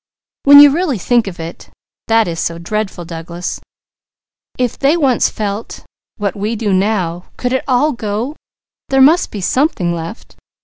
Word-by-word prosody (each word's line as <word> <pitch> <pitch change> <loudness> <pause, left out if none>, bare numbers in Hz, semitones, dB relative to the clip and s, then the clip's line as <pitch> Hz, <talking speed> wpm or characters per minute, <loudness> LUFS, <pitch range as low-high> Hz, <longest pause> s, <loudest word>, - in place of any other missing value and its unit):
When 285 0 +9
you 290 -1 +9
really 315 -4 0
think 235 +3 +1
of 180 -3 -7
it, 165 +1 -8 0.4
that 225 -2 +3
is 165 -1 -4
so 170 - -2
dreadful, 190 0 -4
Douglas. 170 +1 -6 1.0
If 250 -2 -2
they 285 +5 +3
once 270 -7 +2
felt 210 +1 -5 0.3
what 200 -3 -2
we 210 +3 -2
do 210 -3 -1
now, 185 -3 0
could 250 0 -2
it 260 - 0
all 275 +4 +2
go? 230 +4 -4 0.5
There 270 - +2
must 305 +7 +5
be 205 - -6
something 185 - 0
left! 170 +6 -8
215 Hz, 160 wpm, -16 LUFS, 180-260 Hz, 1.0 s, When